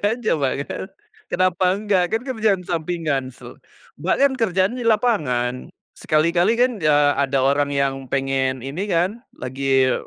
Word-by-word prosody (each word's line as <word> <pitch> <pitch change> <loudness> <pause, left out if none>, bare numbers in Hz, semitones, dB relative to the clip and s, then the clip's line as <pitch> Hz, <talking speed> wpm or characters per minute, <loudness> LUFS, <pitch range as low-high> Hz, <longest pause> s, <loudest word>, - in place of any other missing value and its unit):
aja, 220 +2 0
Mbak, 140 -4 0
kan. - - -5 0.5
Kenapa 185 0 +1 0.2
nggak 200 -4 +2
kan 225 - +1
kerjaan 215 -6 +1
sampingan 160 -6 -2
se - - -14 0.5
Mbak, - - +1
kan 280 -1 +4
kerjaannya 205 0 0
di - - -3
lapangan 150 - +1 0.4
sekali-kali 170 +6 +2
kan 250 +1 +4
ya 145 -1 +4
ada 135 -1 +1
orang 140 +1 +2
yang 140 -1 +1 0.2
pengen 135 -1 0
ini 150 +9 -4
kan, 185 +7 0
lagi 130 0 +1
160 Hz, 145 wpm, -21 LUFS, 135-205 Hz, 0.5 s, kan